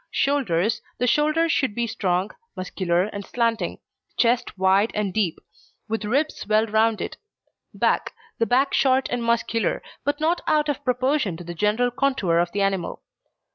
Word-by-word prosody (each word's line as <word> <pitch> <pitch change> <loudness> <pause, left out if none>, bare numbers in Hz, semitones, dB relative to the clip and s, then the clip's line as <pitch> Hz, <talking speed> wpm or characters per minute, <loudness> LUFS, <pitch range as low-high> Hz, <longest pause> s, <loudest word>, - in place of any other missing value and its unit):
SHOULDERS 230 -9 +1 0.2
The 250 - 0
shoulders 305 +5 +2
should 260 -10 0
be 235 - 0
strong, 190 -3 -1 0.2
muscular, 180 -1 0
and 200 0 -5
slanting; 230 +1 -1 0.3
the - - -40
chest 240 -2 0
wide 190 +3 +3
and 205 -3 -1
deep, 195 -6 0 0.5
with 220 -1 -2
ribs 280 +6 -1
well 215 +1 +4
rounded. 220 0 0 0.6
BACK - - +1 0.3
The 230 - +2
back 265 +3 +2
short 265 -1 +3
and 245 -1 -1
muscular, 230 0 0 0.2
but 290 +1 -1
not 325 +3 +1
out 300 -1 +2
of 290 - -2
proportion 250 - 0
to 175 - -9
the 175 0 -6
general 210 +7 +1
contour 245 -10 +1
of 175 0 0
the 200 +1 0
animal. 195 -3 -2
225 Hz, 160 wpm, -24 LUFS, 195-260 Hz, 0.6 s, well